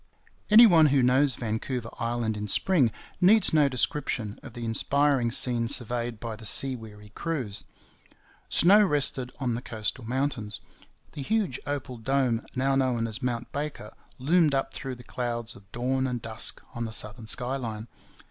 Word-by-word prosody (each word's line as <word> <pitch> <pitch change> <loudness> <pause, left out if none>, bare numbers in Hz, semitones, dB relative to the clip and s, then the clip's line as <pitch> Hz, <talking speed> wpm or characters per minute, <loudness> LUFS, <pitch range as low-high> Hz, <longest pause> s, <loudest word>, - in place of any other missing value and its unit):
Any 220 +3 +9
one 165 -7 +6
who 140 -2 +3
knows 130 +1 +3
Vancouver 115 +1 -4
Island 115 -2 -1
in 105 0 -4
spring 135 - +2 0.3
needs 205 +2 +5
no 150 -3 +4
description 125 -4 -1
of - - -11
the 120 0 -6
inspiring 135 +2 +1
scene 120 -1 +1
surveyed 120 -1 -1
by 115 -1 -5
the 110 - -13
sea 135 -1 +3
weary 105 -3 -12
crews. 130 -5 -3 0.8
Snow 205 +5 +6
rested 140 -7 +1
on 125 -4 -1
the 115 - -3
coastal 110 +1 -4
mountains. 120 -3 -3 0.5
The 145 - -7
huge 195 - -1
opal 140 -3 -4
dome 125 -1 0
now 135 +1 +1
known 125 -4 +1
as 110 +2 -5
Mount 120 -2 -3
Baker 145 -7 -5 0.2
loomed 155 +2 +3
up 135 - -1
through 135 -2 -5
the 120 - -13
clouds 120 0 -4
of 100 0 -18
dawn 130 +2 -1
and 125 -1 -3
dusk 110 -1 -1
on 120 0 -3
the 110 - -5
southern 110 +1 -3
sky 125 +3 -2
line. 110 -3 -5
125 Hz, 165 wpm, -27 LUFS, 115-140 Hz, 0.8 s, Any